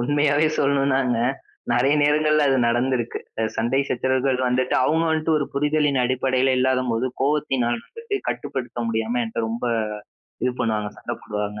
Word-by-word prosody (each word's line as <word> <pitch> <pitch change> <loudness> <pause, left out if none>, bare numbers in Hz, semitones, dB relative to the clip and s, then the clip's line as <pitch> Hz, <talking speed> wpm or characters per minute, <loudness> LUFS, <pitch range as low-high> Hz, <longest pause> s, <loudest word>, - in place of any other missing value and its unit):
உண்மையாவே 145 +3 +2
சொல்லணும்னாங்க, 135 -3 +2 0.6
நறைய 130 +4 +3
நேரங்கள்ல 150 +1 +3
அது 135 - +3
நடந்திருக்கு. 120 0 0 0.2
அ - - +1
சண்டை 120 +4 +1
சச்சரவுகள் 130 +1 0
வந்துட்டு 125 +1 0
அவங்க 160 +3 +2
வந்ட்டு 160 +1 0
ஒரு 150 - +1
புரிதலின் 145 -1 +1
அடிப்படைல 130 +1 +1
இல்லாத 130 0 +2
போது, 115 +3 0
கோபத்தினால 135 -4 +1
வந்துட்டு 460 -3 -5
கட்டுப்படுத்த 130 -4 -4
முடியாம 115 +2 -1
என்ட்ட 110 - -6
ரொம்ப 115 +2 -4 0.8
இது 125 0 +1
பண்ணுவாங்க, 105 -2 -1
சண்ட - - -5
போடுவாங்க. 105 0 -4
130 Hz, 140 wpm, -23 LUFS, 120-145 Hz, 0.8 s, நறைய